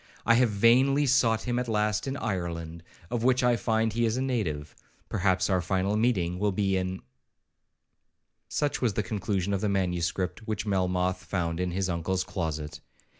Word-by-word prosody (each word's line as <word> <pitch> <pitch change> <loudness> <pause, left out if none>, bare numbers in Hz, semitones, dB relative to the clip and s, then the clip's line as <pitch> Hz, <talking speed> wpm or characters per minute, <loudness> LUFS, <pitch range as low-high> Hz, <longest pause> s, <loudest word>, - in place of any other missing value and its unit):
I 115 - +5
have 120 0 +4
vainly 125 +7 +4
sought 120 -4 +3
him 120 0 -1
at 125 - -3
last 105 +1 0
in 135 +1 -2
Ireland, 85 - -4 0.3
of 120 -2 -1
which 125 0 +3
I 125 -1 +4
find 110 -1 0
he 120 +1 0
is 115 +2 0
a - - 0
native.—Perhaps 95 - -2
our 95 -2 +1
final 95 +3 0
meeting 95 -6 +1
will 105 0 +1
be 95 0 0
in 95 0 -2 1.5
Such 145 -1 -1
was 115 -6 +1
the 110 - 0
conclusion 100 -1 -2
of 95 - -1
the 105 - +1
manuscript 90 +1 -1
which 105 -1 -2
Melmoth 90 -1 0
found 85 -2 -2
in 90 0 0
his 95 +2 -1
uncle's 90 +2 -1
closet. 80 -5 -4
100 Hz, 170 wpm, -28 LUFS, 90-115 Hz, 1.5 s, I